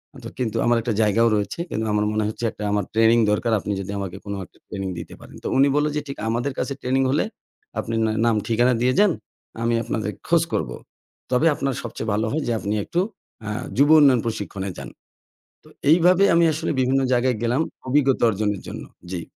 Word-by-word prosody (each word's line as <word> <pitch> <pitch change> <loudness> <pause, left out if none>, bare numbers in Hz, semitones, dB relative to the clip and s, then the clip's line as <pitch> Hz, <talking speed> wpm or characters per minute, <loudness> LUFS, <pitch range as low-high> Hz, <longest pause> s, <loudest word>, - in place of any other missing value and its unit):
আ - - -11
ত - - -10
কিন্তু 115 -2 -1
আমার 120 0 +3
একটা 115 0 -1
জায়গাও 110 +2 +3
রয়েছে। 105 +9 -2
কিন্তু 110 +1 -2
আমার 105 0 +1
মনে 110 0 0
হচ্ছে 110 - -6
একটা 105 - -8
আমার 105 0 +1
ট্রেনিং 115 +1 +4
দরকার। 115 +3 0
আপনি 105 - -4
যদি 100 +1 -6
আমাকে 95 -3 -5
কোন 100 - -4
একটা - - -26
ট্রেনিং 95 -1 -4
দিতে - - -9
পারেন।" - - -14
তো - - -3
উনি 135 +1 +5
বললো 150 +1 +2
যে 150 - 0
ঠি - - -4 0.2
"আমাদের 120 +4 -1
কাছে 140 - -2
ট্রেনিং 130 +1 +1
হলে, 145 - +1 0.5
আপনি 115 - -3
না 110 - +1
নাম 115 -2 +3
ঠিকানা 120 +2 +3
দিয়ে 125 +1 +3
যান। 205 -2 +5 0.5
আমি 115 0 +1
আপনাদের 110 -2 -2 0.2
খোঁজ 165 0 +4
করবো। 65 -6 -1 0.6
তবে 125 +5 +3
আপনার 135 -1 -1
সবচেয়ে 115 -1 -5
ভালো 110 +2 0
হয় 155 +2 -1
যে - - 0
আপনি 105 0 -2
একটু 175 - -1 0.5
আ - - -2 0.3
যুব 145 +2 +5
উন্নয়ন 135 -5 +5
প্রশিক্ষণে 100 -3 -4
যান।" - - -7 0.7
তো - - -19 0.2
এইভাবে 180 +4 +5
আমি 170 0 +5
আসলে 160 +2 -2
বিভিন্ন 130 +1 +2
জায়গায় 125 0 +2
গেলাম 120 +5 +1 0.3
অভিজ্ঞতা 135 -1 +2
অর্জনের 105 -2 -1
জন্য। - - -6 0.3
জি। 90 -2 -3
115 Hz, 205 wpm, -23 LUFS, 105-135 Hz, 0.7 s, উনি